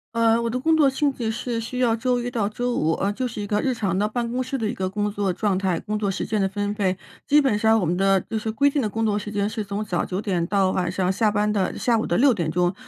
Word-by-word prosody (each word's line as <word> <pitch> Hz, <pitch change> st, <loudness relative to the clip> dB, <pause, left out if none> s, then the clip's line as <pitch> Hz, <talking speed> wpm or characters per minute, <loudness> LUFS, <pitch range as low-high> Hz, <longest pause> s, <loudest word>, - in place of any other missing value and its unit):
呃， 230 Hz, 0 st, +3 dB
我 235 Hz, -, -1 dB
的 245 Hz, -, -2 dB
工 320 Hz, +5 st, +2 dB
作 285 Hz, -3 st, +5 dB
性 280 Hz, +2 st, +1 dB
质 235 Hz, -4 st, -3 dB
是 235 Hz, +1 st, -3 dB
需 240 Hz, +3 st, -5 dB
要 240 Hz, -3 st, +3 dB
周 245 Hz, +1 st, 0 dB
一 245 Hz, -, -3 dB
到 225 Hz, -5 st, 0 dB
周 245 Hz, +4 st, -2 dB
五， 160 Hz, -4 st, +1 dB
呃， 200 Hz, +4 st, 0 dB
就 250 Hz, +5 st, -2 dB
是 220 Hz, -3 st, -6 dB
一 -, -, -3 dB
个 205 Hz, +1 st, 0 dB
日 260 Hz, +2 st, 0 dB
常 195 Hz, -5 st, -1 dB
的 210 Hz, -, +2 dB
办 235 Hz, +1 st, -3 dB
公 255 Hz, -, -1 dB
室 255 Hz, +2 st, -3 dB
的 225 Hz, -, -2 dB
一 -, -, -2 dB
个 185 Hz, -1 st, -2 dB
工 205 Hz, +1 st, -2 dB
作 200 Hz, -2 st, -1 dB
状 200 Hz, 0 st, 0 dB
态、 185 Hz, -3 st, 0 dB
工 210 Hz, +4 st, -3 dB
作 200 Hz, -2 st, 0 dB
时 190 Hz, -, -2 dB
间 215 Hz, -, -1 dB
的 195 Hz, -, +2 dB
分 205 Hz, +1 st, -2 dB
配。 195 Hz, -3 st, 0 dB, 0.3 s
基 295 Hz, +1 st, +5 dB
本 240 Hz, -7 st, +1 dB
上 220 Hz, +1 st, +4 dB
我 -, -, 0 dB
们 170 Hz, +2 st, 0 dB
的 195 Hz, -1 st, +3 dB
就 220 Hz, 0 st, -4 dB
是 220 Hz, +1 st, -4 dB
规 280 Hz, +6 st, +3 dB
定 285 Hz, -1 st, 0 dB
的 215 Hz, -, 0 dB
工 225 Hz, +2 st, -2 dB
作 210 Hz, -1 st, +1 dB
时 210 Hz, -, -7 dB
间 205 Hz, 0 st, -1 dB
是 215 Hz, -1 st, -4 dB
从 200 Hz, +2 st, -3 dB
早 180 Hz, -5 st, -1 dB
9 190 Hz, +2 st, -3 dB
点 180 Hz, -5 st, -1 dB
到 195 Hz, -1 st, +2 dB
晚 180 Hz, -2 st, -1 dB
上 185 Hz, 0 st, 0 dB
下 215 Hz, +3 st, +2 dB
班 210 Hz, 0 st, +1 dB
的 200 Hz, -3 st, -1 dB
下 235 Hz, -2 st, +2 dB
午 -, -, -2 dB
的 -, -, +1 dB
6 265 Hz, +1 st, +5 dB
点 170 Hz, -7 st, -2 dB
钟， 175 Hz, +2 st, +1 dB
210 Hz, 325 characters per minute, -23 LUFS, 195-235 Hz, 0.3 s, 作